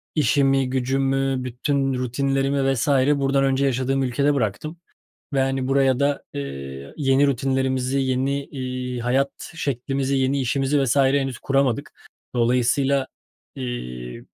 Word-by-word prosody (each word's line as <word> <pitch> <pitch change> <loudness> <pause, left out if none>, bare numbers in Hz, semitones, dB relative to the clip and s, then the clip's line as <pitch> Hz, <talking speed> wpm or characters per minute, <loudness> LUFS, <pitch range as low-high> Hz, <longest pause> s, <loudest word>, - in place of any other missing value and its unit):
işimi 135 -2 +2
gücümü, 135 0 0
bütün 135 +2 -1
rutinlerimi 135 +2 0
vs. 125 - -1
buradan 140 0 +3
önce 135 0 +2
yaşadığım 135 +1 0
ülkede 140 +3 +1
bıraktım 135 - -2 0.6
ve, 135 - +2
hani, 135 -1 0
buraya 135 -1 +3
da, 140 0 +1
eee, 70 0 -6
yeni 135 0 +3
rutinlerimizi, 130 0 0
yeni, 135 +2 0
iii, 125 -2 -5
hayat 135 +3 +1 0.2
şeklimizi, 135 -1 -1
yeni 135 +1 +1
işimizi 135 +3 +1
vs. 130 -1 +1
henüz 135 -1 +2
kuramadık. 135 -3 0 0.4
Dolayısıyla, 125 +3 +2 0.5
eee, 60 - -6
135 Hz, 115 wpm, -23 LUFS, 125-140 Hz, 0.6 s, buradan